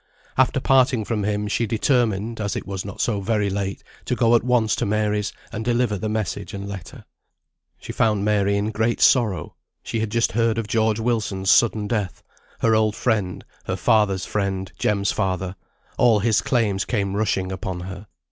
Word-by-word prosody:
After -, -, +3 dB
parting 130 Hz, -4 st, +3 dB
from 105 Hz, -2 st, -1 dB
him 105 Hz, 0 st, -1 dB
she 115 Hz, +2 st, 0 dB
determined, 115 Hz, -2 st, 0 dB
as 100 Hz, -1 st, -2 dB
it -, -, -4 dB
was 95 Hz, -1 st, -4 dB
not 100 Hz, -, -8 dB
so 105 Hz, -4 st, 0 dB
very 105 Hz, -1 st, 0 dB
late, 100 Hz, 0 st, -3 dB, 0.2 s
to -, -, 0 dB
go 115 Hz, 0 st, +3 dB
at 115 Hz, -, +4 dB
once 120 Hz, -3 st, +2 dB
to -, -, 0 dB
Mary's, 105 Hz, 0 st, 0 dB, 0.2 s
and 110 Hz, 0 st, -4 dB
deliver 120 Hz, -2 st, +1 dB
the 105 Hz, +2 st, -3 dB
message 105 Hz, -1 st, -3 dB
and 100 Hz, 0 st, -6 dB
letter. 100 Hz, -5 st, -9 dB, 0.7 s
She -, -, -7 dB
found 105 Hz, -3 st, +1 dB
Mary 100 Hz, -1 st, +2 dB
in 105 Hz, +2 st, -1 dB
great 110 Hz, +2 st, 0 dB
sorrow. 105 Hz, -, +3 dB, 0.3 s
She 115 Hz, -, -3 dB
had 110 Hz, -1 st, -1 dB
just 115 Hz, +2 st, +1 dB
heard 115 Hz, +2 st, +1 dB
of 115 Hz, -, -1 dB
George 110 Hz, 0 st, +1 dB
Wilson's 105 Hz, -5 st, 0 dB
sudden 110 Hz, -3 st, +3 dB
death: 105 Hz, -5 st, -3 dB, 0.4 s
her 115 Hz, -, +3 dB
old 110 Hz, -1 st, +2 dB
friend, 105 Hz, -7 st, -1 dB, 0.2 s
her 90 Hz, -, -2 dB
father's 95 Hz, 0 st, +2 dB
friend, 95 Hz, -3 st, -2 dB
Jem's 100 Hz, -1 st, +1 dB
father 95 Hz, -2 st, -2 dB, 0.4 s
all 120 Hz, -3 st, +5 dB
his 110 Hz, +1 st, +2 dB
claims 105 Hz, -6 st, +1 dB
came 100 Hz, -4 st, -1 dB
rushing 95 Hz, -3 st, 0 dB
upon 95 Hz, -2 st, -4 dB
her. 95 Hz, +3 st, -8 dB
105 Hz, 180 wpm, -23 LUFS, 100-115 Hz, 0.7 s, all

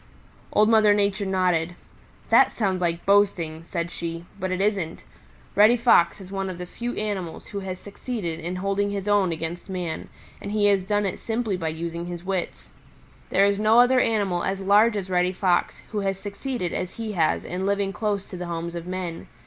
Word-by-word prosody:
Old 210 Hz, 0 st, +4 dB
Mother 215 Hz, -2 st, +5 dB
Nature 200 Hz, -1 st, 0 dB
nodded. 180 Hz, -3 st, +1 dB, 0.6 s
"That -, -, +6 dB
sounds 190 Hz, -5 st, -1 dB
like 170 Hz, -1 st, -1 dB
boasting," 185 Hz, -6 st, +2 dB
said 170 Hz, 0 st, -4 dB
she, 170 Hz, 0 st, -5 dB
"but 185 Hz, -, -2 dB
it 185 Hz, -, -1 dB
isn't. 195 Hz, -5 st, -1 dB, 0.5 s
Reddy 215 Hz, +4 st, +6 dB
Fox 220 Hz, -8 st, +4 dB
is 190 Hz, -1 st, -11 dB
one 195 Hz, -1 st, -2 dB
of 185 Hz, -, -6 dB
the 180 Hz, -, -5 dB
few 240 Hz, +7 st, -5 dB
animals 200 Hz, -6 st, -4 dB
who 200 Hz, -, -4 dB
has 190 Hz, -1 st, -5 dB
succeeded 200 Hz, -4 st, -5 dB
in 175 Hz, +3 st, -4 dB
holding 195 Hz, +2 st, 0 dB
his 200 Hz, 0 st, -4 dB
own 205 Hz, -3 st, +3 dB
against 165 Hz, +3 st, -5 dB
man, 180 Hz, -4 st, -4 dB, 0.3 s
and 200 Hz, -, -5 dB
he 210 Hz, -1 st, +2 dB
has 200 Hz, -1 st, +4 dB
done 205 Hz, +2 st, 0 dB
it 195 Hz, -, -3 dB
simply 225 Hz, -3 st, -1 dB
by 165 Hz, -3 st, -3 dB
using 170 Hz, +2 st, -4 dB
his 175 Hz, -1 st, -6 dB
wits. 190 Hz, -2 st, -3 dB, 0.6 s
There 195 Hz, -, +4 dB
is 200 Hz, 0 st, +1 dB
no 215 Hz, +2 st, +5 dB
other 250 Hz, +1 st, +6 dB
animal 200 Hz, -7 st, +1 dB
as 195 Hz, 0 st, -1 dB
large 210 Hz, +3 st, +4 dB
as 195 Hz, -2 st, -3 dB
Reddy 180 Hz, 0 st, +2 dB
Fox 180 Hz, -2 st, 0 dB
who 215 Hz, -, -1 dB
has 195 Hz, -1 st, -1 dB
succeeded 205 Hz, -1 st, -4 dB
as 185 Hz, -, -3 dB
he 225 Hz, -2 st, -4 dB
has 165 Hz, -6 st, +1 dB
in 185 Hz, +2 st, -3 dB
living 200 Hz, -1 st, 0 dB
close 205 Hz, -3 st, -2 dB
to 185 Hz, -, -6 dB
the 175 Hz, 0 st, -5 dB
homes 170 Hz, 0 st, -4 dB
of 170 Hz, 0 st, -6 dB
men. 180 Hz, -2 st, -5 dB
195 Hz, 195 wpm, -25 LUFS, 175-205 Hz, 0.6 s, That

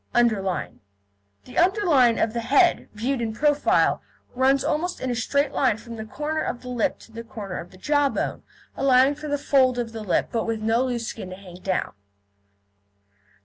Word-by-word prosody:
UNDERLINE 215 Hz, -6 st, +1 dB, 0.7 s
The -, -, -3 dB
underline 340 Hz, -, +4 dB
of 220 Hz, -, 0 dB
the 235 Hz, -, -1 dB
head, 285 Hz, +9 st, +3 dB
viewed 245 Hz, +4 st, -1 dB
in 225 Hz, -1 st, -2 dB
profile, 290 Hz, +3 st, +2 dB, 0.3 s
runs 265 Hz, +1 st, +3 dB
almost 325 Hz, +4 st, -1 dB
in 255 Hz, -, -2 dB
a -, -, -1 dB
straight 280 Hz, +4 st, 0 dB
line 255 Hz, -7 st, +2 dB
from 230 Hz, +1 st, -9 dB
the 220 Hz, -1 st, -6 dB
corner 300 Hz, +7 st, -3 dB
of 245 Hz, -, -4 dB
the 250 Hz, -, -7 dB
lip 245 Hz, -3 st, 0 dB
to -, -, -16 dB
the 230 Hz, +1 st, -7 dB
corner 215 Hz, -6 st, -6 dB
of 170 Hz, -, -9 dB
the 185 Hz, -, -16 dB
jawbone, 290 Hz, +6 st, 0 dB, 0.3 s
allowing 265 Hz, +1 st, +4 dB
for 300 Hz, +1 st, -8 dB
the 290 Hz, 0 st, 0 dB
fold 260 Hz, -3 st, +3 dB
of 235 Hz, -2 st, -2 dB
the 225 Hz, -1 st, -7 dB
lip, 205 Hz, -4 st, 0 dB
but 230 Hz, -2 st, -1 dB
with 225 Hz, -1 st, -1 dB
no 225 Hz, +3 st, +1 dB
loose 240 Hz, -2 st, -2 dB
skin 210 Hz, -4 st, -6 dB
to 185 Hz, -, -7 dB
hang 185 Hz, -2 st, -12 dB
down. 185 Hz, -1 st, -1 dB
245 Hz, 190 wpm, -24 LUFS, 225-280 Hz, 0.7 s, underline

